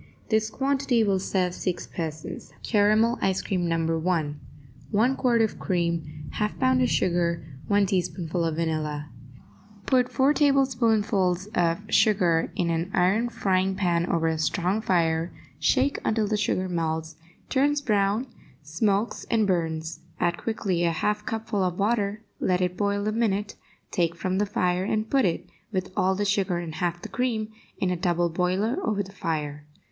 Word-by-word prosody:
This 220 0 +2
quantity 270 -1 +1
will 195 -3 +2
serve 185 -1 0
six 180 0 -3
persons. 160 -2 -6
CARAMEL 215 +2 +3
ICE 190 -1 +1
CREAM, 180 -3 -1
No. 165 -1 0
1 160 -4 -1 0.5
1 230 +5 +2
quart 240 -4 +3
of 220 - -2
cream 170 -4 -2
1/2 210 0 -1
pound 255 -1 +3
of 250 - +3
sugar 170 -3 +1 0.2
1 200 0 +3
teaspoonful 175 -3 -1
of 165 -2 0
vanilla 155 -2 -2 0.7
Put 250 -1 +3
four 275 +2 +3
tablespoonfuls 225 - +2
of 170 +3 +1
the 215 - -13
sugar 175 -6 +3
in 170 -1 0
an 165 +2 -1
iron 195 +6 +2
frying 190 -4 +1
pan 175 -3 +1
over 165 -1 +1
a 160 -1 0
strong 180 +6 0
fire, 165 -4 +1 0.3
shake 260 - +2
until 220 -1 +1
the 215 +1 0
sugar 185 -2 0
melts, 160 -2 -2 0.3
turns 285 +2 +2
brown, 210 -2 +1 0.4
smokes 195 +8 -1
and 225 -2 +3
burns; 160 -4 -1 0.2
add 175 0 +1
quickly 190 -4 -1
a 170 - +3
half 210 +7 -1
cupful 225 -3 -2
of 180 -1 -1
water; 210 0 0 0.2
let 180 -1 +1
it 180 -1 0
boil 200 +1 0
a - - +1
minute, 210 -2 0 0.4
take 170 -1 +1
from 185 +2 -1
the 205 - +1
fire, 180 -2 0
and 215 +2 -1
put 270 -4 +4
it, 175 0 -1 0.2
with 185 -2 -2
all 190 +1 +2
the 205 +2 -1
sugar 195 -3 +1
and 170 -2 -5
half 175 0 -1
the - - -4
cream, 230 -4 -1 0.3
in 185 - 0
a - - +1
double 175 -1 +1
boiler 185 - 0
over 205 - 0
the 190 - -12
fire. 150 -5 -4
190 Hz, 165 wpm, -26 LUFS, 170-215 Hz, 0.7 s, put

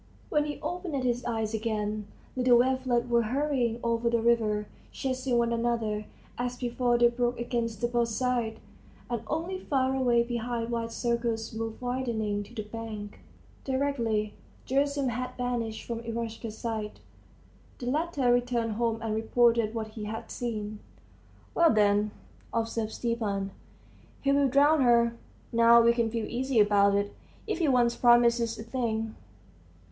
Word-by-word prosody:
When 295 0 +2
he 295 -1 -5
opened 350 -7 -3
his 245 -1 0
eyes 225 -2 -1
again, 215 -1 -2 0.3
little 250 -1 +5
wavelets 255 -1 +2
were 235 -1 +3
hurrying 250 -1 0
over 235 0 +1
the 235 0 +2
river, 220 -2 +2 0.3
chasing 260 -1 -1
one 235 0 +2
another; 230 -3 -1 0.3
as 245 0 -2
before 245 0 +1
they 240 0 +6
broke 240 0 -1
against 235 -2 -2
the 240 - +2
boat's 240 -1 +1
side, 240 -1 -1 0.5
and 235 -2 -1
only 335 - -2
far 265 -6 0
away 245 -3 +3
behind 235 0 -3
wide 230 -1 -2
circles 235 -2 -1
moved 225 0 -4
widening 235 -5 -1
to 220 +4 -11
the 215 - -3
bank. 210 -1 -7 0.4
Directly 240 -6 0 0.3
Gerasim 280 0 +1
had 250 +2 -4
vanished 240 -3 -2
from 235 -1 -4
Eroshka's 230 -1 -5
sight, 220 -3 -4 0.8
the 245 - -7
latter 280 -2 +1
returned 240 -2 0
home 225 +1 0
and 220 -1 -1
reported 230 0 +2
what 220 -1 -3
he 215 -1 -7
had 220 +1 -6
seen. 215 -3 -4 0.7
"Well, 340 -1 +5
then," 210 -1 +3 0.4
observed 225 -1 -2
Stepan, 210 -5 -2 0.7
"he'll 280 0 +3
drown 285 +3 +4
her. 235 -2 +4 0.4
Now 230 0 +7
we 235 0 +5
can 235 -1 +1
feel 225 -1 -2
easy 255 0 0
about 200 -1 +5
it. 200 0 0 0.3
If 435 - -2
he 330 - +2
once 245 -3 +3
promises 235 -1 +4
a 220 - -6
thing 225 -2 -2
235 Hz, 145 wpm, -28 LUFS, 225-250 Hz, 0.8 s, Now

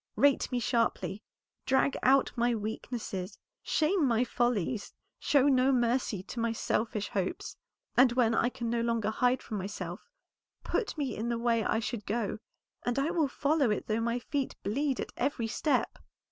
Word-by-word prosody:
Rate 285 -1 +3
me 250 - 0
sharply, 230 -3 0 0.5
drag 265 +1 +3
out 265 +1 +4
my 240 0 +2
weaknesses, 215 -3 -5 0.2
shame 325 +3 +1
my 235 0 +3
follies, 240 -3 -1 0.2
show 280 -3 +3
no 265 -1 +4
mercy 240 -5 +1
to 235 - -7
my 230 0 +1
selfish 215 -2 -1
hopes; 190 -2 -3 0.4
and 250 0 +6
when 240 -2 +3
I 240 - +2
can 240 -1 -5
no 235 0 0
longer 230 -2 0
hide 250 +3 +1
from 215 -3 -4
myself 185 - -6 0.5
put 430 -7 -2
me 275 -6 -2
in 225 +3 -3
the 235 - 0
way 230 -1 +1
I 220 - +1
should 225 -2 -4
go, 220 0 -1 0.4
and 245 +1 -1
I 280 +4 +1
will 330 -5 +2
follow 280 -1 +1
it 210 - -1
though 220 +1 0
my 235 +1 0
feet 275 +2 -3
bleed 270 +6 0
at - - -4
every 275 -5 0
step." 265 +6 0
235 Hz, 170 wpm, -30 LUFS, 220-265 Hz, 0.5 s, and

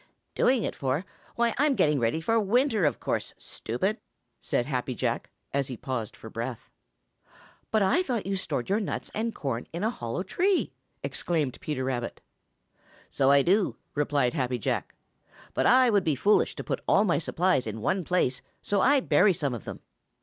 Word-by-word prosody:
"Doing 250 -4 +3
it - - -2
for? 140 +6 -1 0.3
Why, 235 -1 +2
I'm 290 -1 +3
getting 150 - +3
ready 120 +7 0
for 225 +7 +2
winter, 220 - +2
of 145 - +1
course, - - -2
stupid!" 190 - -3 0.4
said 120 - -1
Happy 130 -2 -2
Jack, - - -2 0.2
as 140 -1 0
he 125 - -6
paused 115 -5 -4
for - - -10
breath. 115 +2 -6 1.0
"But 220 -2 +2
I 195 - +3
thought 245 - -2
you 195 +1 -1
stored 185 -9 -3
your 200 +3 +2
nuts 205 - -4
and 225 +1 -2
corn 125 -4 -3
in 170 +3 -4
a 220 - +2
hollow 120 - -4
tree!" 365 - +1 0.3
exclaimed 155 -7 -1
Peter 145 -4 -2
Rabbit. 125 -2 -3 0.9
"So 135 -1 +2
I 140 0 +6
do," 195 +5 +2 0.2
replied 145 -4 +1
Happy 130 -5 -1
Jack, 110 - -2 0.6
"but - - +2
I 255 -1 +6
would 200 -3 +3
be 155 -4 +1
foolish 205 +10 +3
to - - -5
put - - -3
all 205 - +4
my 175 - +2
supplies 170 -6 +1
in 110 0 -4
one 185 - 0
place, 145 -7 +1 0.2
so 200 -1 +1
I 280 0 +5
bury 210 -5 +4
some 145 -5 -1
of 115 - -6
them." - - -7
165 Hz, 180 wpm, -27 LUFS, 130-215 Hz, 1.0 s, I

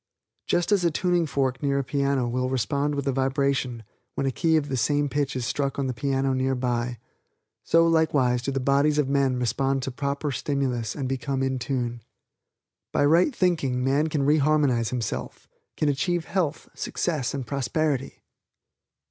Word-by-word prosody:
Just 175 +3 +1
as 200 -3 +3
a 170 - +4
tuning 175 +1 +1
fork 135 -3 -1
near 140 -1 +1
a 140 - 0
piano 140 -2 0
will 125 +1 -1
respond 140 +4 0
with 140 -1 -2
a 135 - +1
vibration 135 -2 0 0.3
when - - -1
a 135 - +1
key 160 +4 +2
of 150 -2 -1
the 135 - -2
same 145 +4 +1
pitch 145 -1 -1
is 125 -2 -2
struck 140 +4 -1
on 140 - 0
the 130 - -1
piano 135 +1 0
nearby, 125 -2 -1 0.7
so 165 0 +4
likewise 145 -7 +2
do 130 - -3
the 135 - -1
bodies 140 +3 +2
of 150 -3 +2
men 135 -2 +1
respond 135 +3 0
to 135 - -3
proper 140 +2 -2
stimulus 130 -5 -2
and 135 -3 -3
become 135 +1 -2
in 130 -1 -1
tune. 120 -2 -2 0.9
By - - +2
right 170 - +4
thinking 140 -9 +1
man 140 +4 +2
can 150 -3 -1
re 150 +3 +4
harmonize 140 -6 +2
himself, 120 -3 -4 0.3
can 155 - +1
achieve 165 +4 0
health, 165 -6 -2
success 150 -7 -2
and 135 -3 -4
prosperity. 140 0 -2
140 Hz, 175 wpm, -25 LUFS, 130-150 Hz, 0.9 s, a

